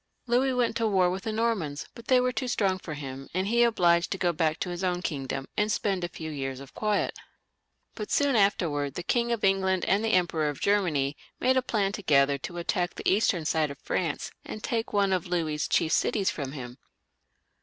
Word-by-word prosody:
Louis 250 Hz, +2 st, +2 dB
went 245 Hz, -2 st, +1 dB
to 230 Hz, -, +1 dB
war 185 Hz, -4 st, +3 dB
with 190 Hz, +1 st, -5 dB
the 220 Hz, -, -1 dB
Normans,, 215 Hz, -10 st, -1 dB
but 235 Hz, -1 st, -13 dB
they 255 Hz, -1 st, +5 dB
were 250 Hz, 0 st, +1 dB
too 255 Hz, 0 st, -3 dB
strong 195 Hz, -6 st, +1 dB
for 155 Hz, -4 st, -6 dB
him, 135 Hz, -1 st, -7 dB
and 185 Hz, +1 st, +1 dB
he 230 Hz, +4 st, 0 dB
was 240 Hz, -, +7 dB
obliged 175 Hz, -6 st, +3 dB
to 195 Hz, -, -2 dB
go 175 Hz, -2 st, +1 dB
back 155 Hz, -1 st, 0 dB
to 180 Hz, -, -1 dB
his 175 Hz, +1 st, -5 dB
own 180 Hz, -1 st, 0 dB
kingdom, 135 Hz, -3 st, -3 dB
and 210 Hz, +1 st, +1 dB
spend 195 Hz, -4 st, 0 dB
a -, -, 0 dB
few 160 Hz, -2 st, -7 dB
years 135 Hz, -3 st, -4 dB
of 140 Hz, -1 st, -12 dB
quiet. 210 Hz, -2 st, -1 dB, 0.7 s
But 210 Hz, -, -6 dB
soon 285 Hz, -2 st, +2 dB
after, 170 Hz, -9 st, +2 dB
the 155 Hz, +6 st, -6 dB
King 235 Hz, +5 st, +1 dB
of 230 Hz, -2 st, -1 dB
England 190 Hz, -1 st, +2 dB
and 200 Hz, +3 st, +2 dB
the 225 Hz, -, +1 dB
Emperor 165 Hz, -4 st, +2 dB
of 145 Hz, -, -6 dB
Germany 160 Hz, -9 st, +1 dB, 0.2 s
made 260 Hz, +1 st, +3 dB
a 260 Hz, -, +4 dB
plan 210 Hz, -6 st, 0 dB
together 140 Hz, -8 st, +2 dB
to 175 Hz, +6 st, -7 dB
attack 175 Hz, +1 st, -1 dB
the -, -, -4 dB
eastern 190 Hz, -5 st, +2 dB
side 155 Hz, -1 st, +1 dB
of 140 Hz, -, -8 dB
France, 165 Hz, -5 st, -2 dB
and 215 Hz, -, -8 dB
take 230 Hz, -1 st, -2 dB
one 200 Hz, -2 st, +2 dB
of 180 Hz, -1 st, -1 dB
Louis's 160 Hz, -4 st, -1 dB
chief 160 Hz, -, +1 dB
cities 200 Hz, -3 st, +2 dB
from 140 Hz, -3 st, -5 dB
him. 125 Hz, -2 st, -8 dB
185 Hz, 220 wpm, -27 LUFS, 155-215 Hz, 0.7 s, was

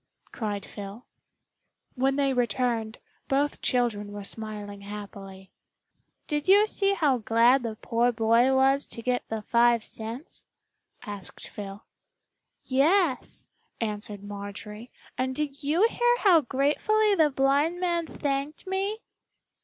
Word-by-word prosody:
cried 205 Hz, -4 st, -3 dB
Phil. 205 Hz, +3 st, -9 dB, 0.9 s
When 270 Hz, +1 st, +1 dB
they 275 Hz, -1 st, +2 dB
returned 235 Hz, -2 st, 0 dB, 0.3 s
both 285 Hz, +2 st, 0 dB
children 225 Hz, -5 st, 0 dB
were 205 Hz, 0 st, -7 dB
smiling 205 Hz, -1 st, -7 dB
happily. 200 Hz, -2 st, -9 dB, 0.7 s
"Did 295 Hz, +1 st, -2 dB
you 405 Hz, +2 st, +7 dB
see 395 Hz, -2 st, 0 dB
how 285 Hz, -8 st, +2 dB
glad 230 Hz, +4 st, +4 dB
the 230 Hz, -2 st, -4 dB
poor 235 Hz, +2 st, +1 dB
boy 230 Hz, +3 st, +3 dB
was 270 Hz, +1 st, +3 dB
to 230 Hz, -, -9 dB
get 250 Hz, 0 st, -1 dB
the 220 Hz, -1 st, -3 dB
five 235 Hz, 0 st, +3 dB
cents?" 230 Hz, +9 st, -6 dB, 0.6 s
asked 205 Hz, -3 st, -7 dB
Phil. 200 Hz, 0 st, -8 dB, 0.8 s
"Yes," 290 Hz, +2 st, +1 dB, 0.3 s
answered 210 Hz, -2 st, -4 dB
Marjorie, 205 Hz, +3 st, -8 dB, 0.3 s
"and 260 Hz, 0 st, 0 dB
did 290 Hz, -1 st, -3 dB
you 320 Hz, +9 st, +3 dB
hear 485 Hz, +1 st, +2 dB
how 360 Hz, -6 st, +6 dB
gratefully 300 Hz, -, +2 dB
the 315 Hz, -6 st, +4 dB
blind 285 Hz, +5 st, +2 dB
man 345 Hz, -2 st, 0 dB
thanked 280 Hz, +1 st, -3 dB
me?" 390 Hz, +3 st, -2 dB
250 Hz, 120 wpm, -27 LUFS, 215-295 Hz, 0.9 s, you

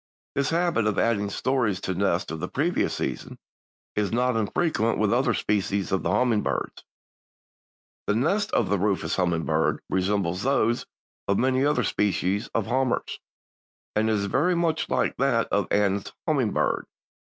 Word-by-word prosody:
This 140 Hz, 0 st, 0 dB
habit 165 Hz, -9 st, +1 dB
of 105 Hz, -, 0 dB
adding 105 Hz, -3 st, +1 dB
stories 115 Hz, -3 st, 0 dB
to 95 Hz, -, -2 dB
nests 95 Hz, 0 st, 0 dB
of 80 Hz, -, -5 dB
the 90 Hz, -, -3 dB
previous 165 Hz, -, 0 dB
season -, -, -4 dB, 0.6 s
is 105 Hz, -2 st, 0 dB
not 125 Hz, +1 st, +1 dB
infrequent 115 Hz, -, 0 dB
with 105 Hz, -1 st, +2 dB
other 120 Hz, -2 st, +2 dB
species 100 Hz, -1 st, -1 dB
of 95 Hz, -3 st, +1 dB
the 85 Hz, -, -1 dB
hummingbirds. 110 Hz, +2 st, 0 dB, 1.2 s
The 105 Hz, -, +2 dB
nest 195 Hz, -, +1 dB
of -, -, +1 dB
the 100 Hz, -1 st, +1 dB
Rufous 100 Hz, 0 st, 0 dB
Hummingbird 80 Hz, -3 st, +1 dB
resembles 95 Hz, -1 st, 0 dB
those 130 Hz, -2 st, +1 dB, 0.4 s
of 100 Hz, -, +2 dB
many 130 Hz, +1 st, +2 dB
other 150 Hz, +1 st, +2 dB
species 100 Hz, +1 st, 0 dB
of 115 Hz, -, +1 dB
hummers, 130 Hz, +1 st, -1 dB, 0.8 s
and 110 Hz, +1 st, +2 dB
it -, -, +2 dB
is 100 Hz, -2 st, 0 dB
very 175 Hz, -, +1 dB
much 165 Hz, -2 st, 0 dB
like 130 Hz, -, 0 dB
that 125 Hz, -4 st, +2 dB
of 100 Hz, -, +1 dB
the -, -, +2 dB
Anna's 100 Hz, -1 st, 0 dB, 0.2 s
hummingbird. -, -, +1 dB
105 Hz, 155 wpm, -25 LUFS, 100-130 Hz, 1.2 s, with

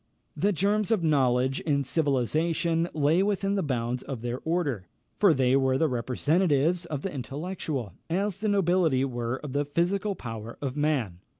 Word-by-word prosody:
The 205 Hz, -, +2 dB
germs 205 Hz, +3 st, +1 dB
of 220 Hz, -6 st, +2 dB
knowledge 130 Hz, -3 st, +2 dB
and 140 Hz, -3 st, +1 dB
civilisation 160 Hz, +4 st, +1 dB
lay 155 Hz, +4 st, +3 dB
within 200 Hz, 0 st, 0 dB
the 200 Hz, -, +1 dB
bounds 125 Hz, -4 st, -2 dB
of 130 Hz, -5 st, -6 dB
their 120 Hz, +1 st, -3 dB
order; 145 Hz, -, -1 dB, 0.3 s
for 200 Hz, -4 st, +6 dB
they 130 Hz, -3 st, +3 dB
were 130 Hz, -1 st, +2 dB
the 160 Hz, -, +2 dB
representatives 150 Hz, +6 st, +1 dB
of 150 Hz, -4 st, -4 dB
the 195 Hz, -, -3 dB
intellectual, 140 Hz, -, -4 dB, 0.2 s
as 195 Hz, +3 st, -1 dB
the 215 Hz, -, -1 dB
nobility 175 Hz, -9 st, +2 dB
were 120 Hz, -2 st, -2 dB
of 145 Hz, -3 st, -6 dB
the 145 Hz, +1 st, +1 dB
physical 190 Hz, +7 st, 0 dB
power 115 Hz, -3 st, -7 dB
of 135 Hz, -2 st, -3 dB
man. 140 Hz, -, 0 dB
150 Hz, 165 wpm, -27 LUFS, 130-180 Hz, 0.3 s, for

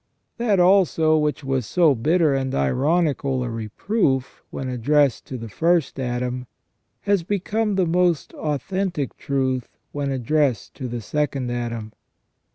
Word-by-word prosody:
That 220 Hz, -5 st, +2 dB
also 175 Hz, -4 st, +4 dB
which 150 Hz, -2 st, 0 dB
was 135 Hz, -3 st, -1 dB
so 170 Hz, -5 st, +4 dB
bitter 155 Hz, +5 st, +2 dB
and 135 Hz, -1 st, -1 dB
ironical 135 Hz, -, +1 dB
a 120 Hz, -, -3 dB
reproof, 130 Hz, -, -1 dB
when 135 Hz, -, -5 dB
addressed 135 Hz, +1 st, +2 dB
to 130 Hz, -, -6 dB
the 115 Hz, -1 st, -7 dB
first 165 Hz, -, +1 dB
Adam, 125 Hz, 0 st, -2 dB, 0.5 s
has 200 Hz, -2 st, +2 dB
become 205 Hz, +4 st, -1 dB
the 190 Hz, -2 st, +2 dB
most 175 Hz, -1 st, +1 dB
authentic 155 Hz, 0 st, -2 dB
truth 130 Hz, -3 st, -2 dB
when 145 Hz, -1 st, -2 dB
addressed 135 Hz, -2 st, 0 dB
to 130 Hz, -, -4 dB
the 120 Hz, -1 st, -4 dB
second 140 Hz, -1 st, -2 dB
Adam. 115 Hz, -3 st, -4 dB
140 Hz, 135 wpm, -23 LUFS, 125-170 Hz, 0.5 s, also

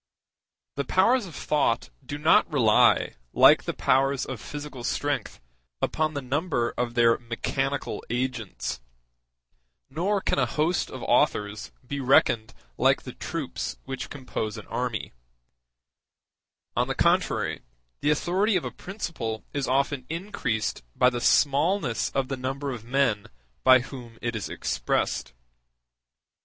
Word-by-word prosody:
The 140 Hz, -, 0 dB
powers 205 Hz, -, +3 dB
of 165 Hz, -, -11 dB
thought 150 Hz, -, 0 dB
do 145 Hz, -, -5 dB
not 155 Hz, +2 st, +4 dB
rely, 115 Hz, -8 st, +4 dB, 0.2 s
like -, -, +6 dB
the -, -, -2 dB
powers 135 Hz, +1 st, +2 dB
of 125 Hz, -5 st, -6 dB
physical 145 Hz, -3 st, -7 dB
strength, 145 Hz, +3 st, -2 dB, 0.4 s
upon 155 Hz, -1 st, 0 dB
the 140 Hz, -, -3 dB
number 130 Hz, -2 st, 0 dB
of 120 Hz, -1 st, -2 dB
their 115 Hz, -1 st, +4 dB
mechanical 135 Hz, +4 st, -2 dB
agents, 120 Hz, -, -3 dB, 1.1 s
nor 190 Hz, +8 st, 0 dB
can 190 Hz, -, 0 dB
a 130 Hz, -, +2 dB
host 155 Hz, +8 st, 0 dB
of -, -, -7 dB
authors 105 Hz, +1 st, +1 dB
be 140 Hz, +3 st, -4 dB
reckoned 125 Hz, -4 st, +3 dB, 0.2 s
like -, -, +3 dB
the -, -, -8 dB
troops -, -, -4 dB
which 135 Hz, -, -5 dB
compose 115 Hz, -6 st, -4 dB
an 105 Hz, -, -8 dB
army; 120 Hz, -3 st, -3 dB, 1.6 s
on -, -, +2 dB
the -, -, -2 dB
contrary, -, -, +1 dB, 0.4 s
the 145 Hz, -, +1 dB
authority 185 Hz, +8 st, +2 dB
of 180 Hz, -, 0 dB
a -, -, -3 dB
principle 160 Hz, -, -5 dB
is 140 Hz, -1 st, -1 dB
often 135 Hz, 0 st, 0 dB
increased 160 Hz, -, -2 dB
by 125 Hz, 0 st, +4 dB
the 120 Hz, -1 st, -3 dB
smallness 145 Hz, -, +2 dB
of 135 Hz, -1 st, -1 dB
the 135 Hz, 0 st, -3 dB
number 135 Hz, +2 st, -3 dB
of 120 Hz, -4 st, -6 dB
men 120 Hz, -4 st, +1 dB, 0.4 s
by 130 Hz, -1 st, +7 dB
whom 120 Hz, -3 st, -10 dB
it 120 Hz, -1 st, -3 dB
is 110 Hz, -, -4 dB
expressed. -, -, -1 dB
135 Hz, 135 wpm, -26 LUFS, 120-150 Hz, 1.6 s, by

